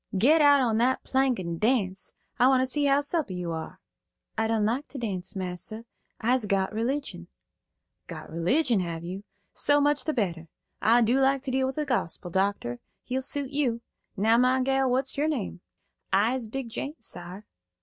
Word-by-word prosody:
"Get 300 Hz, +11 st, +5 dB
out 285 Hz, -1 st, +6 dB
on 230 Hz, -4 st, +1 dB
that 255 Hz, +2 st, +2 dB
plank 265 Hz, -2 st, +1 dB
and 170 Hz, -2 st, -4 dB
dance. 210 Hz, -5 st, 0 dB, 0.2 s
I 245 Hz, -, +6 dB
want 260 Hz, -1 st, +4 dB
to -, -, +2 dB
see 285 Hz, +3 st, +1 dB
how 280 Hz, 0 st, +4 dB
supple 290 Hz, -, -2 dB
you 175 Hz, -1 st, -3 dB
are." 160 Hz, -1 st, -6 dB, 0.6 s
"I 225 Hz, 0 st, 0 dB
don't 220 Hz, -2 st, +1 dB
like 245 Hz, +7 st, -1 dB
to -, -, -9 dB
dance, 195 Hz, -5 st, -4 dB
massa; 185 Hz, +4 st, -5 dB, 0.3 s
I'se 245 Hz, -1 st, +1 dB
got 195 Hz, 0 st, 0 dB
religion." 260 Hz, +6 st, -3 dB, 0.8 s
"Got -, -, -9 dB
religion, 225 Hz, -, +2 dB
have 170 Hz, -2 st, -4 dB
you? 185 Hz, +4 st, -6 dB, 0.3 s
So 290 Hz, 0 st, +3 dB
much 290 Hz, 0 st, +2 dB
the 310 Hz, -, 0 dB
better. 170 Hz, -8 st, -2 dB, 0.3 s
I 235 Hz, +3 st, +5 dB
like 265 Hz, +3 st, +3 dB
to 270 Hz, -, -3 dB
deal 260 Hz, 0 st, +1 dB
in -, -, -4 dB
the 300 Hz, -, -1 dB
gospel, 180 Hz, -, -2 dB
doctor. 190 Hz, -11 st, -1 dB, 0.2 s
He'll 260 Hz, +1 st, -2 dB
suit 280 Hz, 0 st, -4 dB
you. 255 Hz, -5 st, 0 dB, 0.4 s
Now, 220 Hz, +4 st, +4 dB
my 255 Hz, +1 st, +3 dB
gal, 270 Hz, 0 st, +2 dB
what's 260 Hz, +2 st, 0 dB
your 300 Hz, -, +2 dB
name?" 230 Hz, -, -3 dB, 0.5 s
"I 215 Hz, +5 st, +3 dB
is 255 Hz, -4 st, -3 dB
Big 255 Hz, +1 st, -5 dB
Jane, 280 Hz, +6 st, -4 dB
sar." 180 Hz, +4 st, -7 dB
240 Hz, 180 wpm, -27 LUFS, 195-270 Hz, 0.8 s, out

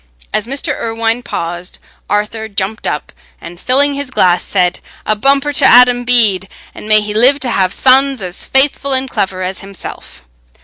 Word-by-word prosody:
As 215 Hz, -, -1 dB
Mr. 275 Hz, +2 st, -3 dB
Irwine 225 Hz, +1 st, -2 dB
paused, 175 Hz, -4 st, -6 dB, 0.3 s
Arthur 215 Hz, +2 st, -2 dB
jumped 205 Hz, +1 st, -4 dB
up -, -, -4 dB, 0.3 s
and, 175 Hz, 0 st, -11 dB
filling 280 Hz, +5 st, +2 dB
his 280 Hz, -1 st, -5 dB
glass, 180 Hz, -8 st, +2 dB
said, 180 Hz, -2 st, -1 dB, 0.3 s
"A 215 Hz, -, +1 dB
bumper 275 Hz, +5 st, +1 dB
to 285 Hz, -, +1 dB
Adam 245 Hz, -1 st, +5 dB
Bede, 215 Hz, -6 st, +2 dB, 0.2 s
and 215 Hz, -, -10 dB
may 215 Hz, 0 st, +5 dB
he 210 Hz, 0 st, -5 dB
live 255 Hz, +6 st, +4 dB
to 250 Hz, -2 st, -2 dB
have 185 Hz, -2 st, 0 dB
sons 270 Hz, +2 st, +3 dB
as 180 Hz, -2 st, -5 dB
faithful 275 Hz, 0 st, +3 dB
and 260 Hz, 0 st, 0 dB
clever 190 Hz, -6 st, -3 dB
as 185 Hz, +1 st, -5 dB
himself!" 195 Hz, -, -10 dB
225 Hz, 170 wpm, -13 LUFS, 195-265 Hz, 0.3 s, Adam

